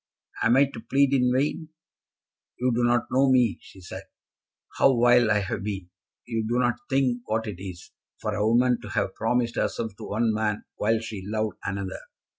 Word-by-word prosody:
Am 120 +3 +4
I 140 - +6
to 135 -4 -9
plead 135 +4 +2
in 125 -2 +3
vain?" 150 +5 -1 0.9
"You 125 +1 +1
do 120 +1 +1
not 120 0 +3
know 135 +1 +4
me," 125 -5 +3
she 95 - -15
said; 90 - -8 0.8
"how 130 -3 +5
vile 120 -1 +5
I 105 -1 +3
have 95 +1 -3
been! 95 -3 -5 0.3
You 115 -2 -2
do 120 +2 0
not 120 -1 +1
think 130 -2 +1
what 110 +1 -1
it 100 -4 -6
is, 90 -3 -9 0.3
for 105 - -3
a 105 0 -1
woman 120 +2 +3
to - - -9
have - - -1
promised 120 +1 0
herself 110 -3 -2
to - - -8
one 110 +1 +1
man 105 -1 -1
while 110 +2 +1
she 110 -4 -6
loved 110 0 -2
another." 95 -1 -4
115 Hz, 190 wpm, -26 LUFS, 105-125 Hz, 0.9 s, I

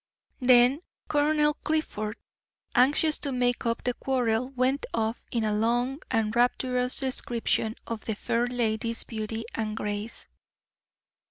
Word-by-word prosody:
Then 250 +3 +5 0.3
Colonel 300 0 +2
Clifford, 225 -9 -2 0.6
anxious 290 +5 +4
to 280 - -2
make 245 -1 0
up 230 0 -1
the 250 - 0
quarrel, 250 -2 0
went 265 +1 0
off 225 +1 -1
in 230 -2 0
a 215 -1 +1
long 240 +6 0
and 225 -2 0
rapturous 250 +1 +2
description 235 -4 -1
of 230 -2 -6
the 220 - -2
fair 235 +3 0
lady's 230 -1 0
beauty 225 0 -5
and 215 -1 -3
grace. 210 +2 -4
240 Hz, 125 wpm, -27 LUFS, 225-260 Hz, 0.6 s, Then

